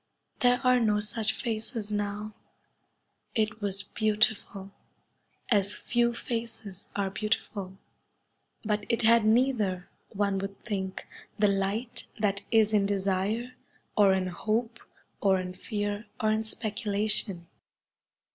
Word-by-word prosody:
There 245 -1 +4
are 255 0 +5
no 210 -3 +3
such 215 +1 -1
faces 220 -1 -3
now. 205 +1 -2 1.0
It 215 -1 0
was 200 -1 0
beautiful, 210 -2 0 0.8
as 200 -2 +3
few 235 0 +1
faces 225 -5 -5
are 200 -1 0
beautiful, 195 -2 -2 0.9
but 210 -1 0
it 230 0 +1
had 230 0 +6
neither, 215 -6 +2 0.2
one 200 -1 0
would 195 0 -5
think, 190 -4 -3 0.3
the 210 -1 +4
light 200 +5 -1
that 200 -2 +1
is 220 -2 +4
in 200 -2 +4
desire 200 +5 0 0.4
or 205 -2 +6
in 190 -1 0
hope 220 +6 -1 0.4
or 190 -2 +4
in 180 0 -4
fear 205 +2 -3
or 215 -2 +2
in 215 0 +2
speculation. 210 -4 -1
210 Hz, 120 wpm, -29 LUFS, 195-225 Hz, 1.0 s, had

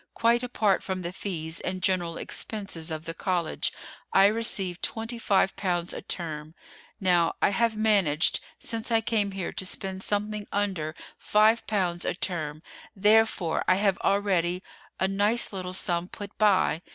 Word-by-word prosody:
Quite 235 +1 +3
apart 220 -6 +1
from 185 -1 -4
the 170 - -3
fees 170 -4 -5
and 185 0 -3
general 175 -3 +1
expenses 195 -6 -4
of 160 0 -5
the 165 - -4
college, 175 -2 -1 0.4
I 195 - +6
receive 200 -4 +1
twenty 225 +1 -3
five 195 -3 +2
pounds 175 -2 -1
a - - -6
term. 155 -2 -5 0.4
Now, 175 -3 +3
I - - +4
have 220 +2 +1
managed 195 -8 +3 0.2
since 230 +1 -3
I 225 -1 +4
came 215 -2 +1
here 190 -3 -3
to - - -4
spend 190 0 -1
something 210 +1 -2
under 185 -6 -1 0.2
five 215 +2 +3
pounds 180 -5 0
a - - -1
term, 155 -5 -3 0.3
therefore 210 -4 +3
I 185 - +5
have 195 -1 +1
already 185 -3 +1 0.4
a 190 - +2
nice 205 +4 +2
little 185 -1 -4
sum 175 -1 0
put 200 +1 -9
by. 190 -6 +3
190 Hz, 155 wpm, -27 LUFS, 175-210 Hz, 0.4 s, I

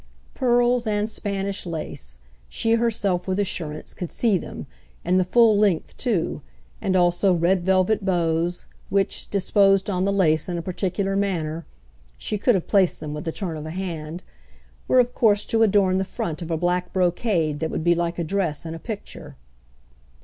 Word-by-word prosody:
Pearls 245 -1 +2
and 210 0 0
Spanish 200 -2 -3
lace—she 65 - -5
herself, 210 -6 0
with 190 0 0
assurance, 165 -6 -4
could 175 - -6
see 225 -4 +1
them, 175 - -5 0.4
and 180 +2 +3
the - - +3
"full 225 +3 +4
length" 200 -5 +1
too, 215 -10 -1 0.4
and 190 -1 0
also 175 +1 +3
red 175 +2 +2
velvet 190 +3 +2
bows, 170 -2 0 0.2
which, 195 -1 -1
disposed 195 0 +3
on 185 -1 0
the 200 - +1
lace 165 -5 +2
in 175 - -2
a - - -2
particular 190 +2 -2
manner 170 -5 -2 0.5
(she 210 - -3
could 245 +2 +3
have 185 - -1
placed 195 -4 +3
them 150 -1 -6
with 150 0 -6
the 165 - -1
turn 175 -2 -4
of 155 0 -6
a - - -5
hand) 170 -2 -5 0.6
were - - +3
of 245 0 +2
course 210 -3 +3
to 225 - 0
adorn 195 -3 +3
the - - +1
front 170 -3 -4
of 170 - -6
a 165 - 0
black 180 +1 -1
brocade 175 -4 0
that 160 - -2
would - - -3
be 170 +1 +4
like 170 0 -2
a 170 - -1
dress 165 -4 -2
in 160 - -5
a 165 - -7
picture. 165 - -8
185 Hz, 180 wpm, -23 LUFS, 165-200 Hz, 0.6 s, full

